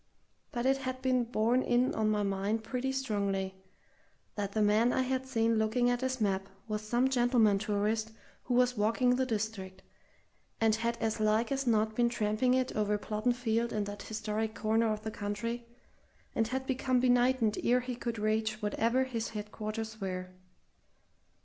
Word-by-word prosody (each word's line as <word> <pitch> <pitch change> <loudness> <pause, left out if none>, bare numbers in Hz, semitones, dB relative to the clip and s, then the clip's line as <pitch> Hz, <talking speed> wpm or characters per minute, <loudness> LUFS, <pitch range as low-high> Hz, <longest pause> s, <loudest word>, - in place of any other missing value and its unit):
But 240 0 -2
it 270 +1 +4
had 260 -1 -4
been 255 -2 +2
borne 230 +2 +2
in 245 +1 +2
on 215 -1 +1
my 210 -1 +1
mind 200 +3 -1
pretty 255 +3 -2
strongly 200 -7 -1 0.8
that 200 -1 -3
the 220 - +1
man 215 +4 +4
I 260 - +1
had 260 0 -2
seen 230 -3 +2
looking 245 +3 +2
at 245 0 -1
his 260 0 -1
map 195 -2 0 0.2
was 210 -1 -2
some 240 +4 +1
gentleman 240 -5 +3
tourist 215 +2 -1 0.3
who 245 - 0
was 250 0 +3
walking 230 +4 +2
the 260 0 0
district, 205 -4 -4 0.8
and 225 -1 +3
had 235 +2 -1
as 225 -1 -1
like 215 +3 +2
as 275 -1 -1
not 220 -1 +2
been 240 0 +3
tramping 225 +3 +1
it 260 0 0
over 210 -1 +1
Plodden 215 +3 -1
Field 235 -1 0
and 210 -1 -1
that 205 0 -7
historic 220 0 -3
corner 220 +1 +1
of 215 0 -3
the 220 - -3
country, 230 +4 -4 0.7
and 225 - +1
had 265 +2 -3
become 260 -1 +1
benighted 245 -3 +2
ere 250 +1 +3
he 250 0 -4
could 235 -1 -4
reach 215 0 0
wherever 230 +4 +1
his 235 -3 -3
headquarters 215 +1 -5
were. 185 -1 -4
225 Hz, 170 wpm, -31 LUFS, 215-245 Hz, 0.8 s, it